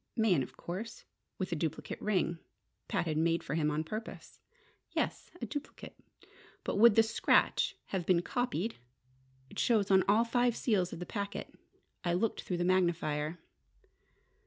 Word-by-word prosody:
"Mayen, 215 Hz, -, +3 dB
of -, -, -7 dB
course: 200 Hz, +6 st, -6 dB, 0.3 s
with 185 Hz, -1 st, -3 dB
a -, -, +1 dB
duplicate 155 Hz, -1 st, -3 dB
ring 185 Hz, -5 st, 0 dB, 0.5 s
Pat -, -, 0 dB
had 155 Hz, -2 st, -1 dB
made 165 Hz, 0 st, +2 dB
for 135 Hz, -, -4 dB
him 155 Hz, -1 st, +2 dB
on 150 Hz, +1 st, -1 dB
purpose." 215 Hz, +7 st, -7 dB, 0.5 s
"Yes, -, -, -2 dB
a -, -, -3 dB
duplicate. 290 Hz, -1 st, -7 dB, 0.7 s
But -, -, -2 dB
would 225 Hz, 0 st, +7 dB
the 225 Hz, -, +7 dB
scratch 220 Hz, 0 st, +2 dB
have 185 Hz, -4 st, -2 dB
been 175 Hz, -2 st, +4 dB
copied? 235 Hz, -3 st, -1 dB, 0.7 s
It -, -, -6 dB
shows 210 Hz, -5 st, +3 dB
on 190 Hz, -1 st, +6 dB
all 220 Hz, +3 st, +5 dB
five 245 Hz, 0 st, +2 dB
seals 195 Hz, -9 st, +1 dB
of -, -, -6 dB
the 180 Hz, -, -5 dB
packet. 200 Hz, 0 st, -5 dB, 0.5 s
I 175 Hz, -, +1 dB
looked 205 Hz, +5 st, 0 dB
through 180 Hz, -, -3 dB
the 175 Hz, -, 0 dB
magnifier." 170 Hz, -4 st, +1 dB
185 Hz, 160 wpm, -32 LUFS, 170-220 Hz, 0.7 s, would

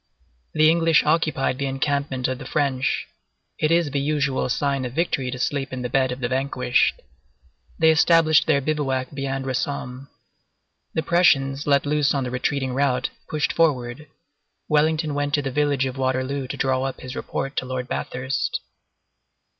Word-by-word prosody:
The 155 Hz, 0 st, +5 dB
English 165 Hz, -1 st, +4 dB
occupied 155 Hz, -4 st, +1 dB
the 140 Hz, -, -1 dB
encampment 135 Hz, -1 st, -1 dB
of 130 Hz, -1 st, -3 dB
the -, -, -8 dB
French; 135 Hz, -3 st, 0 dB, 0.5 s
it 155 Hz, -, +2 dB
is 165 Hz, -3 st, +2 dB
the 140 Hz, -, 0 dB
usual 140 Hz, -2 st, 0 dB
sign 140 Hz, +1 st, 0 dB
of 125 Hz, -1 st, -5 dB
victory 140 Hz, -5 st, -1 dB
to 125 Hz, -, -4 dB
sleep 135 Hz, +2 st, -2 dB
in 130 Hz, -1 st, -4 dB
the 125 Hz, -, -2 dB
bed 130 Hz, -1 st, +2 dB
of 125 Hz, +1 st, -5 dB
the 120 Hz, -, 0 dB
vanquished. 130 Hz, -1 st, 0 dB, 0.7 s
They 160 Hz, 0 st, +5 dB
established 160 Hz, -1 st, +4 dB
their 145 Hz, -3 st, +3 dB
bivouac 135 Hz, -3 st, -1 dB
beyond 135 Hz, -1 st, -3 dB
Rossomme. 130 Hz, 0 st, -3 dB, 0.9 s
The 160 Hz, -, 0 dB
Prussians, 145 Hz, -5 st, +2 dB
let 140 Hz, -1 st, +3 dB
loose 145 Hz, -1 st, +2 dB
on 135 Hz, -, 0 dB
the 125 Hz, -, -4 dB
retreating 130 Hz, +1 st, -1 dB
rout, 130 Hz, -2 st, 0 dB, 0.2 s
pushed 150 Hz, -1 st, 0 dB
forward. 145 Hz, -3 st, 0 dB, 0.6 s
Wellington 155 Hz, 0 st, +2 dB
went 145 Hz, 0 st, 0 dB
to 145 Hz, -, -1 dB
the 135 Hz, -, -3 dB
village 145 Hz, -1 st, +1 dB
of 130 Hz, 0 st, -5 dB
Waterloo 130 Hz, +1 st, -1 dB
to -, -, -5 dB
draw 130 Hz, -1 st, +1 dB
up 135 Hz, 0 st, -4 dB
his 130 Hz, +1 st, -7 dB
report 135 Hz, +1 st, -4 dB
to -, -, 0 dB
Lord 125 Hz, -1 st, -4 dB
Bathurst. 130 Hz, +2 st, -2 dB
140 Hz, 165 wpm, -23 LUFS, 130-150 Hz, 0.9 s, The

